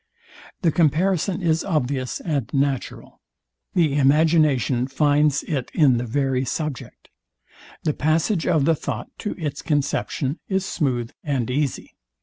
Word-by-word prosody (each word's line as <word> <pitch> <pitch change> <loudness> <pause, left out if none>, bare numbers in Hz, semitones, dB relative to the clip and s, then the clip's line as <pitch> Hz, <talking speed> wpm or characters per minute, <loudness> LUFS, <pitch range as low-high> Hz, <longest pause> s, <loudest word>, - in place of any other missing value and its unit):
The 165 - +4
comparison 180 +4 +1
is 165 -1 +2
obvious 135 -6 -1
and 140 -9 -2
natural: 135 -2 -2 0.5
The 160 -6 +3
imagination 145 -3 +3
finds 145 +1 +2
it 135 -5 -3
in 140 -7 +5
the 120 +1 -3
very 135 +1 0
subject: 145 +1 -5 0.7
The 150 - +1
passage 160 +5 +1
of 160 -6 +3
the 165 - +4
thought 155 - -4
to 210 - -4
its 155 -5 -4
conception 145 -1 -1
is 190 -1 0
smooth 125 -10 -1
and 130 -5 -1
easy. 140 0 -2
145 Hz, 130 wpm, -23 LUFS, 135-160 Hz, 0.7 s, in